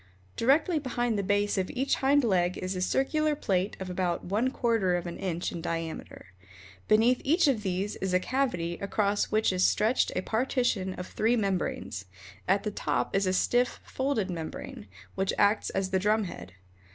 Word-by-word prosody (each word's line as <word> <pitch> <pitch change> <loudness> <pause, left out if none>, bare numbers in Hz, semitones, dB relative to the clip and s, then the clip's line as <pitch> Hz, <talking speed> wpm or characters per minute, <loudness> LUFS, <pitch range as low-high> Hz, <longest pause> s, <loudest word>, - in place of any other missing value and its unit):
Directly 305 +7 +3
behind 240 -4 -1
the 200 - 0
base 205 +1 +1
of 185 - -1
each 265 +2 0
hind 280 +1 +3
leg 185 -5 +1
is 185 +1 -3
a 180 - -3
circular 300 - +1
plate 195 -8 -1
of 190 - -5
about 180 -1 -2
one 215 +8 +1
quarter 225 -8 +1
of 175 - -2
an 170 - -6
inch 175 -2 -2
in 170 - -6
diameter. 165 - -5 0.5
Beneath 230 +4 +4
each 325 +4 +3
of 255 -6 +2
these 195 +1 -2
is 190 -1 -2
a 185 - +3
cavity 185 -8 -1
across 200 0 +1
which 215 -2 +1
is 185 0 +1
stretched 220 +7 +2
a - - 0
partition 225 -5 0
of 180 - -6
three 225 +5 +1
membranes. 190 - -2 0.4
At 195 +2 +2
the 210 - -2
top - - -1
is 195 -1 +2
a - - +2
stiff, 245 +6 +1
folded 260 -8 -1
membrane, 160 - -6 0.3
which 190 0 -1
acts 205 +1 +3
as 190 -1 -2
a 190 - +3
drum 210 +3 +2
head. 135 - -8
200 Hz, 180 wpm, -28 LUFS, 185-245 Hz, 0.5 s, Beneath